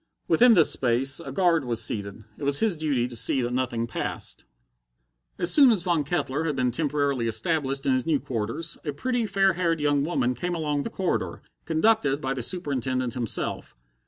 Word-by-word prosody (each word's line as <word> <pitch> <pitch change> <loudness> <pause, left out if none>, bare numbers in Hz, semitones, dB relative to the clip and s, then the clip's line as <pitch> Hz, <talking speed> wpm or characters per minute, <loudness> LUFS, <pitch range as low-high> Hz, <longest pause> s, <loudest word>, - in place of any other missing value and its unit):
Within 240 -2 +5
this 165 - +5
space 130 +2 +2
a 135 - -7
guard 170 0 +2
was 120 -3 -1
seated: 100 0 -3
it - - -10
was 140 0 +2
his 220 -5 +1
duty 145 -6 0
to 125 - -8
see 125 +3 +1
that 120 +1 -2
nothing 120 -2 -1
passed. 115 - -5 0.9
As 175 0 +2
soon 280 -4 +7
as 200 -6 +1
Von 170 -4 +1
Kettler 150 -1 -2
had 150 -3 -1
been 125 -1 0
temporarily 140 -3 0
established 135 +4 -1
in 135 - +3
his 130 +3 -1
new 155 -3 +2
quarters, 115 +7 -3
a 150 - -3
pretty, 245 -3 -1
fair 195 -1 +2
haired 170 -2 0
young 145 -1 +1
woman 135 -6 0
came 175 +8 -3
along 150 -3 -1
the - - -4
corridor, 190 -2 -3 0.2
conducted 160 -4 +2
by 135 -3 -2
the 130 - -4
Superintendent 130 -5 -2
himself. 120 - -3
145 Hz, 190 wpm, -25 LUFS, 125-170 Hz, 0.9 s, soon